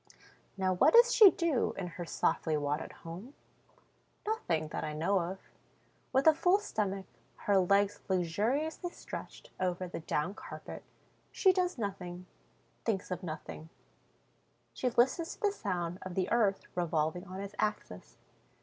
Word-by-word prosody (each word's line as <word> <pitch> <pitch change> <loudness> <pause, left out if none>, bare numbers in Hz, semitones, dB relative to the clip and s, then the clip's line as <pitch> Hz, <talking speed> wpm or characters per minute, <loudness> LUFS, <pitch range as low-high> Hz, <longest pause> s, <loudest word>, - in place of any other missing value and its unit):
Now 190 -1 +1
what 275 - +5
does 480 +1 +8
she 425 -4 +10
do 335 -8 0
in 190 - -3
her 175 0 -6
softly 160 -1 0
wadded 145 +1 -2
home? 185 +12 -8 0.9
Nothing, 170 - -1
that - - -4
I 155 -1 -3
know 170 +6 +1
of. 180 +2 -3 0.7
With 265 +1 +2
a 320 - +8
full 360 +5 +4
stomach, 200 - -2 0.4
her 200 -2 +4
legs 200 +2 +3
luxuriously 225 - 0
stretched - - -9
over 185 0 -1
the 175 - -6
down 155 +3 -1
carpet, - - -9 0.5
she 380 -2 +4
does 365 -3 0
nothing, 185 -4 -5 0.6
thinks 200 -4 -1
of 180 -1 -2
nothing; 160 -2 -7 1.0
she 255 - 0
listens 260 +9 +2
to - - -27
the 415 -2 +3
sound 175 - -3
of 185 -1 -7
the 190 0 0
earth 210 -5 +2
revolving 170 +1 0
on 185 +1 -7
its 200 0 -6
axis. 90 - -3
190 Hz, 145 wpm, -32 LUFS, 175-250 Hz, 1.0 s, she